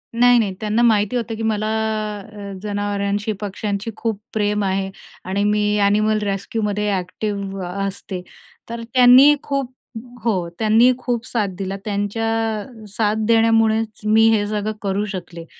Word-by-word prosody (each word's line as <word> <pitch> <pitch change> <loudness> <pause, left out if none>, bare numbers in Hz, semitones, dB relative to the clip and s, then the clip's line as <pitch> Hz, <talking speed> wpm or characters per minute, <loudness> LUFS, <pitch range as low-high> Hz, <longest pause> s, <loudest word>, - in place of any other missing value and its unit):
नाही, 245 +1 +5
नाही, 200 -4 0
त्यांना 215 +2 0
माहिती 220 -1 +3
होतं 230 -2 -2
की 225 - -5
मला 215 -1 0 0.7
अ, 200 -1 -8
जनावरांशी, 205 0 -1
पक्ष्यांशी 205 +2 -3
खूप 225 -3 -2
प्रेम 210 -1 0
आहे 190 0 -1 0.4
आणि 200 +2 0
मी 210 0 +2
ॲनिमल 215 +2 +2
रेस्क्यूमध्ये 210 +1 -2
ॲक्टिव्ह 195 +1 -3 0.2
असते. 190 -1 -5 0.5
तर 235 0 -5
त्यांनी 255 +4 +8
खूप 275 -3 -2 0.5
हो, 185 -7 0
त्यांनी 225 +3 +5
खूप 245 -2 -2
साथ 220 -5 0
दिली. 195 0 -3
त्यांच्या 205 +2 -2 0.4
अ, 225 -2 -12
साथ 210 +1 0
देण्यामुळेच 225 -1 +2
मी 220 +1 +5
हे 215 -2 +2
सगळं 210 0 -2
करू 200 +1 -1
शकले. 170 -2 -7
210 Hz, 140 wpm, -20 LUFS, 200-225 Hz, 0.7 s, त्यांनी